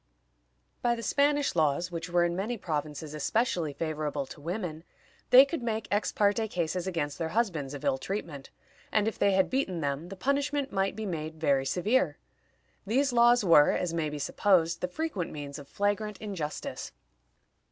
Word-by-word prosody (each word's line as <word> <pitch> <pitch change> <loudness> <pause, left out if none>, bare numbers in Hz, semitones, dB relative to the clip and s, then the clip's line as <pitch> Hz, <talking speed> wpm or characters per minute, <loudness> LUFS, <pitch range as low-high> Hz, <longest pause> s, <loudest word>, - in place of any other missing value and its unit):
By 240 -1 +2
the 230 - -7
Spanish 285 +2 +2
laws, 160 +2 +1
which 170 0 -5
were 175 0 +3
in 170 0 -1
many 215 +6 -2
provinces 155 -4 -4
especially 170 - 0
favorable 150 -2 -3
to 145 - -12
women, 170 -1 -4 0.5
they 255 +2 +9
could 285 0 -4
make 225 -2 -2
ex 205 +1 +1
parte 210 +2 +2
cases 180 -1 -2
against 160 -5 -2
their 165 -1 -1
husbands 160 - 0
of 140 - -7
ill 130 - +1
treatment, 155 -4 -5 0.4
and 215 0 +2
if 225 - -3
they 200 - +3
had 190 0 +2
beaten 190 -11 -1
them 140 +4 -2
the 195 - -7
punishment 280 +4 0
might 195 0 0
be 220 - -4
made 160 -4 -4
very 140 -4 +2
severe. 215 - +1 0.7
These 255 +6 +1
laws 240 -1 +5
were, 155 -4 +6
as 175 -2 -1
may 160 -2 -1
be 150 - -5
supposed, 170 +2 +2
the 180 - 0
frequent 210 - -3
means 145 -1 -7
of 140 - -11
flagrant 205 +3 -1
injustice. 185 -8 -5
180 Hz, 175 wpm, -29 LUFS, 155-220 Hz, 0.7 s, they